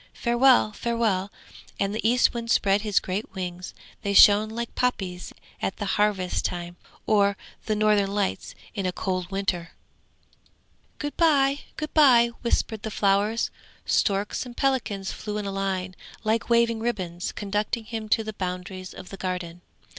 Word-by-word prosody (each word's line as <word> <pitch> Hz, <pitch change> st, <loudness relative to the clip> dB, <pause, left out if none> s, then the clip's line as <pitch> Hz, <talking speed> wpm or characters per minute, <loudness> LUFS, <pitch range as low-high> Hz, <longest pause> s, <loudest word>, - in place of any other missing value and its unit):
Farewell! 240 Hz, -2 st, +4 dB
Farewell!' 215 Hz, -4 st, -1 dB, 0.5 s
And 200 Hz, 0 st, 0 dB
the 220 Hz, -, -2 dB
Eastwind 235 Hz, -1 st, +2 dB
spread 200 Hz, -3 st, +3 dB
his 210 Hz, -2 st, +2 dB
great 195 Hz, +3 st, -4 dB
wings; 180 Hz, -1 st, -5 dB, 0.3 s
they 200 Hz, -1 st, -1 dB
shone 210 Hz, +2 st, +7 dB
like 235 Hz, +1 st, -5 dB
poppies 190 Hz, -8 st, -2 dB, 0.3 s
at 190 Hz, -, -2 dB
the 205 Hz, -, -3 dB
harvest 200 Hz, -2 st, +1 dB
time, 175 Hz, 0 st, -4 dB, 0.3 s
or 200 Hz, -1 st, +3 dB, 0.3 s
the 215 Hz, -, +1 dB
Northern 210 Hz, -2 st, +2 dB
Lights 200 Hz, -1 st, -2 dB, 0.2 s
in 195 Hz, -3 st, -2 dB
a -, -, 0 dB
cold 185 Hz, -1 st, -3 dB
winter. 190 Hz, -4 st, -2 dB, 1.2 s
'Good 290 Hz, -1 st, -4 dB
bye! 285 Hz, -4 st, +3 dB, 0.2 s
good 305 Hz, -1 st, -5 dB
bye!' 245 Hz, -6 st, +6 dB
whispered 225 Hz, -2 st, 0 dB
the 220 Hz, -, -4 dB
flowers. 205 Hz, +2 st, +1 dB, 0.3 s
Storks 200 Hz, +1 st, +1 dB
and 245 Hz, -1 st, -11 dB
pelicans 225 Hz, -8 st, 0 dB
flew 210 Hz, -1 st, -5 dB
in 210 Hz, -, -3 dB
a 200 Hz, -, -3 dB
line 190 Hz, -1 st, -2 dB, 0.3 s
like 220 Hz, +2 st, 0 dB
waving 235 Hz, -1 st, +3 dB
ribbons, 185 Hz, -7 st, -3 dB
conducting 210 Hz, +3 st, -2 dB
him 220 Hz, -1 st, -5 dB
to 220 Hz, +1 st, +3 dB
the 215 Hz, 0 st, -5 dB
boundaries 185 Hz, 0 st, -5 dB
of 185 Hz, -, -10 dB
the 195 Hz, -, -8 dB
Garden. 180 Hz, -2 st, -4 dB
205 Hz, 150 wpm, -25 LUFS, 190-230 Hz, 1.2 s, shone